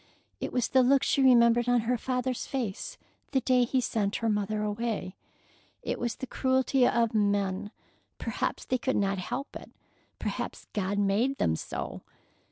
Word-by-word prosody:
It - - -3
was 250 -2 0
the 260 - +5
look 270 +2 +4
she 275 - +2
remembered 240 -2 +5
on 245 -1 +4
her 240 +3 0
father's 250 +1 -2
face 235 -8 -4 0.4
the 265 - +4
day 250 0 +3
he 260 +2 +1
sent 210 -4 -1
her 230 - 0
mother 210 0 0
away. 210 -3 -2 0.7
It - - -2
was 240 -1 -2
the - - -5
cruelty 260 0 +2
of 230 -1 +2
men. 205 -1 +1 0.5
Perhaps - - -3
they 255 - 0
could 260 +2 0
not 195 -1 +1
help 270 +9 -5
it. - - -8 0.5
Perhaps - - -4
God 200 -1 -1
made 205 +7 +1
them 80 - +1
so. - - -5
235 Hz, 165 wpm, -29 LUFS, 205-255 Hz, 0.7 s, the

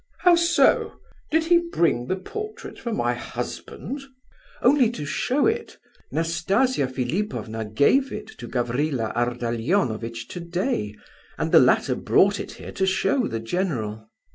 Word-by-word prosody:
"How 360 -1 +6
so? 340 0 +3 0.3
Did 320 +1 +2
he 340 +1 +5
bring 170 - 0
the 185 - 0
portrait 425 - -7
for 235 - -4
my 120 - 0
husband?" 195 - -6 0.6
"Only 255 -1 +5
to 230 -11 -5
show 260 - 0
it. 450 +1 -1 0.3
Nastasia 170 - +1
Philipovna 130 - -3
gave 145 - +3
it - - -5
to 120 - -7
Gavrila 125 0 -1
Ardalionovitch 120 - -1
today, 175 - -2 0.4
and - - -1
the - - +8
latter - - +4
brought - - +3
it - - -6
here - - -9
to 190 - 0
show 190 +8 +2
to - - 0
the 115 - -3
general." 110 - -3
165 Hz, 140 wpm, -24 LUFS, -, 0.6 s, the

